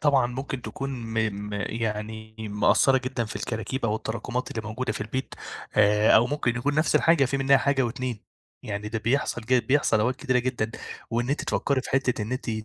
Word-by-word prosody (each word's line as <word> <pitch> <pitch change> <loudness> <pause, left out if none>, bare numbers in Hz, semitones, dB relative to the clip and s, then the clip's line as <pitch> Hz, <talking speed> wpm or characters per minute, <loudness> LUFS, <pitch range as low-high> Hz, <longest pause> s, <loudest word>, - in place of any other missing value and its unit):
طبعًا 140 -4 +4
ممكن 130 +1 -5
تكون 135 0 -5
م 115 -4 -6 0.3
م - - -8
يعني 110 0 -3
مأثرّة 110 +5 +3
جدًا 130 -2 -2
في 105 - -6
الكراكيب 115 +3 -3
أو 110 -1 +1
التراكمات 120 +3 -3
اللي 110 - -4
موجودة 115 0 -2
في - - -6
البيت، 120 +5 -4 0.4
آآ، 105 0 +5
أو 115 - +5
ممكن 125 -3 -1
يكون 145 +4 0
نفس 155 +1 +2
الحاجة 165 -4 +4
فيه 135 +2 -1
منها 135 0 +5
حاجة 135 0 +2
و2 120 -1 -3 0.4
يعني 105 0 -4
ده 110 +1 -2
بيحصل 120 +1 0
جي 125 +2 +3
بيحصل 130 -2 +2
أوقات 125 +4 +1
كتيرة 130 -4 +1
جدًا، 125 -3 -1 0.4
وإن 120 +2 0
أنتِ 145 - 0
تفكّري 140 -2 +1
في - - -8
حتة 130 -5 +1
إن 110 - -4
إنتِ 130 -2 -3
120 Hz, 195 wpm, -26 LUFS, 110-135 Hz, 0.4 s, آآ